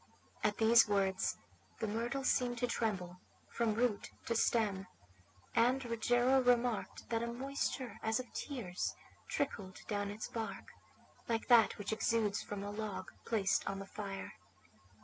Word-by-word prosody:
At 210 -1 +2
these 230 +1 +7
words 195 -2 +1 0.4
the - - 0
myrtle 235 +6 -2
seemed 245 -2 +2
to 245 - +1
tremble 185 -7 -2 0.3
from 230 -3 0
root 230 -3 +1 0.2
to 230 - 0
stem, 205 -5 +2 0.7
and 250 +3 +3
Rogero 245 +3 +3
remarked 245 -2 +1
that 230 -1 +1
a 235 - -1
moisture 255 -2 -3
as 220 +1 +1
of 250 -2 -7
tears 220 -11 -3 0.3
trickled 195 -9 -3
down 205 -1 -1
its 210 +2 -5
bark, 225 -1 -5 0.6
like 230 +1 -1
that 235 -3 +6
which 205 +1 -2
exudes 220 -2 +1
from 205 -1 -5
a 205 - -4
log 205 -3 -4 0.2
placed 210 -4 +2
on 195 - -3
the 195 - -6
fire. 195 -1 -6
225 Hz, 145 wpm, -35 LUFS, 205-240 Hz, 0.7 s, these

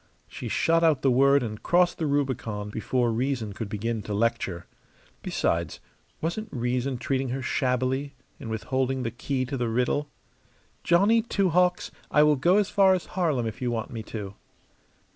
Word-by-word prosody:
She - - -7
shot 165 0 +2
out 155 -5 +3
the 135 - +4
word 140 +2 +4
and 110 -2 -5
crossed 175 0 +2
the 160 - 0
Rubicon 120 -8 -2
before 120 +2 0
reason 120 -3 -2
could 105 0 -5
begin 110 +2 -2
to 105 0 -4
lecture. 100 -6 -1 0.6
Besides, 85 -1 -1 0.4
wasn't 175 +7 -3
reason 125 +1 -1
treating 130 +1 -1
her 130 +2 -3
shabbily 130 +1 -1 0.2
in 115 - -7
withholding 130 +3 -1
the 115 - -2
key 130 +3 -2
to 135 +1 -4
the 120 -2 -1
riddle? 125 +5 0 0.7
"Johnny 200 +7 +4
Two 200 -4 0
Hawks, 180 +1 +2 0.2
I 150 - +5
will 150 0 +5
go 175 +8 +3
as 210 -2 +2
far 195 -2 +5
as 180 - -4
Harlem 155 -10 0
if 110 +1 -5
you 125 - 0
want 115 -2 -3
me 115 -2 -5
to." 105 -3 -6
130 Hz, 170 wpm, -26 LUFS, 115-150 Hz, 0.7 s, I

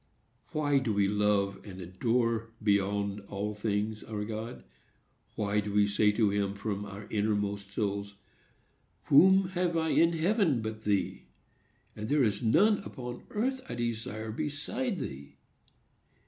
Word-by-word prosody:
Why 145 -3 +2
do 125 -5 -1
we 100 -1 +3
love 105 -1 +1
and 95 -3 -9
adore, 115 +5 0
beyond 100 0 +1
all 105 +1 -3
things, 105 0 -2
our 105 -2 -4
God? 110 - -6 0.7
Why 105 0 0
do 105 0 -3
we 105 0 +4
say 105 +1 +3
to 105 -2 +2
him, 100 -1 0
from 100 0 -3
our 100 +1 -8
inmost 100 -2 -1
souls, 100 -1 -2 0.9
"Whom 190 +5 +6
have 175 -2 0
I 160 0 +1
in 165 +2 +4
heaven 165 - +2
but 110 0 -5
thee, 100 -2 0 0.7
and 105 +1 -5
there 145 -1 +4
is 105 0 +1
none 200 - +4
upon 125 -9 -8
earth 260 +5 -1
I 120 - -3
desire 110 -2 -3
beside 155 - -3
thee"? 70 - -7
110 Hz, 140 wpm, -30 LUFS, 100-140 Hz, 0.9 s, Whom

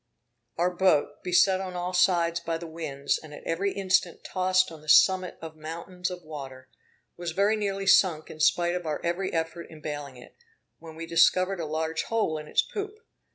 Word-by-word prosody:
Our 175 +2 +2
boat, 175 -5 +2
beset 185 +1 +3
on 185 -1 -6
all 180 +1 -3
sides 175 -2 +3
by 165 0 -3
the 170 - -8
winds, 155 -4 -2
and 150 -2 -11
at - - -12
every 195 +4 -1
instant 190 -3 0
tossed 185 -1 +1
on 160 -2 -11
the 155 - -10
summit 185 +3 +5
of 160 -1 -8
mountains 170 +4 -5
of 180 -1 -8
water, 135 -4 -9 0.5
was 175 -2 -4
very 200 +4 +3
nearly 195 -2 -2
sunk 180 -5 +4
in 155 - -11
spite 175 +2 +3
of 180 -2 -4
our 150 - -2
every 175 +3 -1
effort 165 +1 -3
in 160 - -12
baling 145 -3 -6
it, 125 - -15 0.4
when 160 -1 -11
we 165 +1 -6
discovered 185 +3 +3
a 160 - -3
large 160 +1 -2
hole 215 -9 0
in 150 - -9
its - - +2
poop. 415 0 -6
170 Hz, 195 wpm, -27 LUFS, 155-185 Hz, 0.5 s, summit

